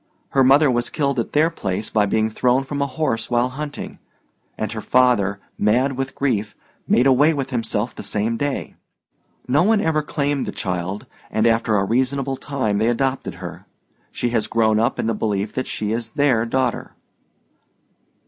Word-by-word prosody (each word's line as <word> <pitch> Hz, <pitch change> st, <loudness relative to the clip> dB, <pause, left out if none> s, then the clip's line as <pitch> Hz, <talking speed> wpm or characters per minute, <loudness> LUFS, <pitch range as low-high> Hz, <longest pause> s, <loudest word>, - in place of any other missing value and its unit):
Her 135 Hz, -, +3 dB
mother 135 Hz, +2 st, +5 dB
was 120 Hz, 0 st, 0 dB
killed 140 Hz, -4 st, 0 dB
at 115 Hz, -, -3 dB
their 155 Hz, +3 st, +3 dB
place 100 Hz, -, -3 dB
by 105 Hz, -2 st, +2 dB
being 110 Hz, +2 st, +1 dB
thrown 125 Hz, +4 st, +2 dB
from 140 Hz, +1 st, -4 dB
a 140 Hz, -, +1 dB
horse 135 Hz, -6 st, -2 dB
while 120 Hz, +1 st, +2 dB
hunting, 145 Hz, +3 st, -6 dB, 0.6 s
and 110 Hz, -, -3 dB
her 110 Hz, -1 st, -5 dB
father, 110 Hz, -6 st, +2 dB, 0.2 s
mad 125 Hz, +6 st, +2 dB
with 135 Hz, +1 st, -4 dB
grief, 110 Hz, -7 st, -1 dB, 0.3 s
made 125 Hz, -, +4 dB
away 145 Hz, +4 st, +4 dB
with 135 Hz, -1 st, -3 dB
himself 115 Hz, -1 st, -1 dB
the -, -, -8 dB
same 110 Hz, +2 st, -1 dB
day. 145 Hz, +3 st, -3 dB, 0.7 s
No 135 Hz, +5 st, +3 dB
one 215 Hz, +3 st, +3 dB
ever 160 Hz, -4 st, +1 dB
claimed 145 Hz, -2 st, -1 dB
the -, -, -2 dB
child, 95 Hz, 0 st, -3 dB, 0.2 s
and 110 Hz, -, +1 dB
after 115 Hz, -2 st, +2 dB
a 100 Hz, -, +1 dB
reasonable 130 Hz, +4 st, 0 dB
time 130 Hz, -7 st, -2 dB
they 110 Hz, -, +2 dB
adopted 135 Hz, +2 st, -1 dB
her. -, -, -9 dB, 0.4 s
She 120 Hz, -, -2 dB
has 110 Hz, -3 st, 0 dB
grown 110 Hz, -1 st, +2 dB
up 115 Hz, +3 st, +1 dB
in -, -, -1 dB
the 115 Hz, -, +1 dB
belief 105 Hz, -1 st, -2 dB
that 130 Hz, -, -3 dB
she 105 Hz, -1 st, -3 dB
is 115 Hz, 0 st, -3 dB
their 130 Hz, -6 st, +2 dB
daughter." 130 Hz, 0 st, -1 dB
120 Hz, 175 wpm, -21 LUFS, 110-140 Hz, 0.7 s, mother